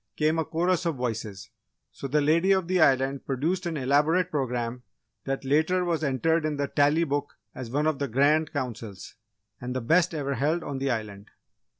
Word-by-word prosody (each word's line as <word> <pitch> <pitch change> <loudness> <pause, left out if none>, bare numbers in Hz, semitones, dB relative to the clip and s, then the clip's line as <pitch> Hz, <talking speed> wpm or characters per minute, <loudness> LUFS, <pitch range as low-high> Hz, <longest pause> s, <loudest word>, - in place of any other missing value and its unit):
came 155 +1 +1
a 160 - 0
chorus 175 +3 0
of 165 - -1
voices, 110 -5 -5 0.4
so 140 - -7
the 150 +3 +1
Lady 165 +6 +3
of 190 -3 +2
the 185 -1 +2
Island 135 -1 +3
produced 165 +7 -1
an 165 -2 -3
elaborate 150 +7 +2
programme 125 -4 -2 0.4
that 135 0 -3
later 160 +6 +2
was 165 -2 -1
entered 155 +4 +1
in 155 -1 -2
the 140 0 -1
Tally 145 +4 +2
Book 145 -2 -3 0.2
as 130 -3 -7
one 145 +5 0
of 155 -3 0
the 140 - -1
Grand 145 +6 +2
Councils 115 -8 -6 0.5
and 125 +1 -5
the - - 0
best 165 +8 +2
ever 140 -2 -2
held 155 +5 0
on 140 -2 -4
the 135 0 -1
Island. 105 -4 -4
145 Hz, 190 wpm, -26 LUFS, 130-160 Hz, 0.5 s, Lady